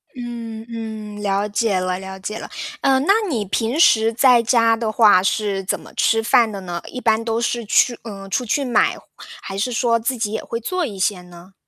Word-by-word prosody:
嗯， 230 -2 -7
嗯， 220 -2 -7
了 200 0 0
解 205 -2 0
了 185 0 -2
了 190 0 -8
解 215 +3 -5
了。 - - -8 0.3
嗯， 265 -1 +3
那 395 - +5 0.2
你 220 -8 -1
平 230 - -1
时 225 -8 +5
在 245 +1 +5
家 230 -1 +3
的 225 -1 -2
话 210 -5 +5
是 200 -1 -1
怎 185 - -2
么 - - -15
吃 225 0 +2
饭 225 -1 +3
的 200 - -6
呢？ 175 -2 -5
一 255 - -6
般 225 -2 +1
都 225 0 -1
是 235 0 -1
去 240 +3 +3
嗯， 195 -3 -9
出 250 - -1
去 275 +4 0
买， 245 - +2 0.4
还 195 0 -7
是 245 +5 -1
说 230 0 +1
自 240 +3 -2
己 215 -2 -2
也 220 - -3
会 230 - -4
做 360 +9 -2
一 210 -8 -7
些 185 -1 0
呢？ 180 +1 -15
220 Hz, 225 characters per minute, -20 LUFS, 200-235 Hz, 0.4 s, 那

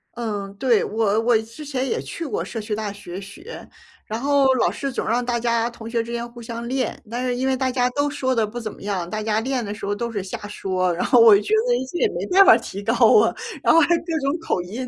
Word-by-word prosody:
嗯， 210 -4 -4
对， 235 +1 +2
我 215 -1 +1
我 235 -1 +3
之 230 +7 -11
前 270 -2 -2
也 - - -1
去 335 - -6
过 285 - -2
社 225 - -6
区 210 0 -3
大 210 -1 -3
学 195 -2 -8
学， 330 - -10 0.4
然 220 +1 -4
后 275 0 +3
老 255 - +2
师 275 -1 -4
总 255 - -3
让 240 +2 +1
大 240 -1 -1
家 235 0 +1
同 230 -1 -10
学 230 0 -1
之 235 - -8
间 235 0 -3
互 240 0 -12
相 235 0 -6
练， 255 -1 -2
但 245 +2 -3
是 250 -1 -1
因 260 +2 -1
为 265 - +2
大 260 0 -1
家 250 -1 +1
都 285 +3 0
说 260 -2 -1
的 225 -2 +2
不 240 +3 -6
怎 215 -2 -6
么 - - -16
样， 195 -4 -3
大 215 +4 -4
家 215 0 0
练 255 0 -2
的 205 -1 -4
时 205 - -7
候 205 - -1
都 235 +2 -3
是 200 -4 -3
瞎 190 - -6
说， 185 -3 -1
然 - - -1
后 250 - +5
我 225 -3 +9
觉 210 +1 -3
得 245 - +3 0.2
这 350 - -3
也 465 - +4
没 - - -4
办 390 +2 +8
法 375 - +8
提 200 - -7
高 225 +3 0 0.3
啊， - - +2 0.3
然 - - +4
后 330 - +7
还 330 +2 +4
有 - - -2
各 330 -2 -1
种 280 +4 -1
口 325 - -1
音。 230 +8 -6
235 Hz, 295 characters per minute, -22 LUFS, 215-260 Hz, 0.4 s, 我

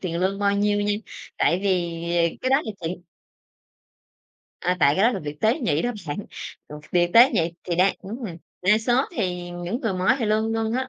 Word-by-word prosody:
tiền 170 -3 -3
lương 190 +2 0
bao 200 0 +2
nhiêu 205 0 +2
nha, 205 0 +1 0.5
tại 175 - +2
vì, 175 -4 0
ờ, 170 -1 +1
cái 255 - -1
đó 270 - +6
là 220 - -4
chuyện 175 +2 -5 1.6
À, 180 +1 0
tại 140 - +5
cái 190 - +1
đó 245 - +4
là - - -2
việc 150 0 -7
tế 225 +6 +2
nhị 160 - +1
đó 245 - 0 0.2
bạn, 145 - -3 0.5
ừ, 150 - -8 0.2
việc 175 -1 +3
tế 240 +4 +8
nhị 170 - 0
thì 175 - -2
đang, 185 +2 +3
ứm 200 +4 -6
ừm 170 -4 -7 0.3
đa 210 +4 +4
số 240 +3 +2
thì 180 -4 -2
những 175 +7 -4
người 225 -4 -1
mới 185 +7 +2
thì 240 - -1
lương 220 +1 +1
lương 225 0 -1
á, 260 +2 -1
195 Hz, 220 wpm, -24 LUFS, 175-225 Hz, 1.6 s, tế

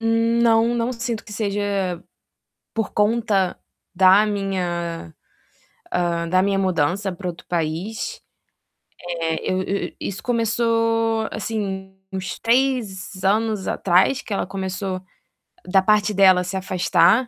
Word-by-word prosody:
não, 230 0 +3
não 235 +1 0
sinto 235 -2 -4
que 210 - -11
seja 200 -4 -1 0.7
por 225 -2 -2
conta 210 -3 +1 0.4
da 190 +3 +6
minha, 175 - -3 0.8
ah, 170 -1 0
da 185 +2 +3
minha 195 0 +1
mudança 185 +2 0
para 180 +1 -6
outro 170 -1 -7
país. 170 +6 -3 0.9
Eh, 165 0 -2
eu 185 0 0
eu 200 +1 -3
isso 195 - -5
começou, 230 -1 +1
assim, 195 -3 -4 0.2
uns 185 -1 -4
3 230 -7 0
anos 215 0 +1
atrás 190 +9 +2
que - - -8
ela 200 - -1
começou, 190 0 -4 0.7
da 190 +1 +5
parte 210 +1 +3
dela 190 -2 +5
se 180 +1 -5
afastar, 190 +5 +3
195 Hz, 120 wpm, -22 LUFS, 185-225 Hz, 0.9 s, da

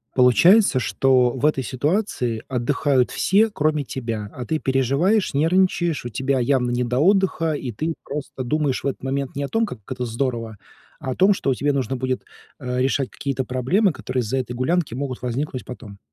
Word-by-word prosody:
Получается, 145 - +5
что 130 0 +3
в 130 +3 -2
этой 150 -3 +2
ситуации 130 - -1
отдыхают 130 +1 +1
все, 210 +4 +3
кроме 155 -6 0
тебя. 115 -6 -5
А 125 - -6
ты 155 - -1
переживаешь, 140 - +1
нервничаешь, 170 -1 +1
у - - -3
тебя 130 +3 0
явно 125 -1 +1
не 120 +1 0
до 125 +1 -1
отдыха, 185 -2 +2
и 135 -4 -4
ты 155 +9 -2
просто 140 -2 -5
думаешь 145 +1 -1
в - - -1
этот 135 - -4
момент 135 0 -3
не 140 - -2
о - - -2
том, 225 +8 +1
как 125 - -8
это 125 -1 -3
здорово, 115 -2 -3 0.4
а 135 -4 -4
о - - -3
том, 195 +2 +5
что 135 -8 0
тебе 145 +3 0
нужно 135 -1 -1
будет, 130 0 -2 0.4
э, 125 -2 -3
решать 135 0 0
какие-то 135 -1 -3
проблемы, 130 - +1
которые 130 -2 -3
из-за 120 +3 -2
этой 125 -2 -3
гулянки 145 +3 0
могут 130 -1 -4
возникнуть 125 +2 -3
потом. 110 -5 -10
135 Hz, 185 wpm, -22 LUFS, 125-155 Hz, 0.4 s, Получается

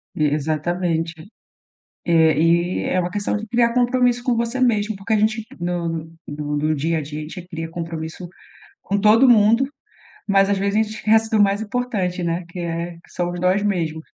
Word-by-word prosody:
E 155 - +1
exatamente. 160 +3 -1 0.9
Eh, 160 -3 +4
e 170 +2 +2
é 185 - +1
uma 175 0 -1
questão 205 +2 -2
de 220 +1 -7
criar 235 +1 +2
compromisso 245 -1 +2
com 245 -3 +1
você 235 +2 -2
mesmo 220 -4 +1
porque 195 +3 -3
a - - +4
gente 220 +1 0
no 165 -2 -3 0.2
no 150 0 -3
no 155 +1 0
dia 160 +3 0
a - - -1
dia, 150 +1 -6
a - - -4
gente 170 +3 -8
cria 165 -2 -6
compromisso 165 +1 -6 0.5
com 200 +1 -1
todo 220 +5 +5
mundo, 230 +2 +5 0.6
mas 195 -1 +3
às 200 - +2
vezes 200 +1 -1
a - - +4
gente 215 0 -7
esquece 220 +1 +2
do 220 -2 +3
mais 200 +1 +2
importante, 205 -6 -2
né, 170 +1 -1
que 180 - -8
é 170 0 -3
que 170 - -20
somos 175 0 -3
nós 185 +3 +2
mesmos. 165 -6 -1
180 Hz, 190 wpm, -21 LUFS, 165-215 Hz, 0.9 s, todo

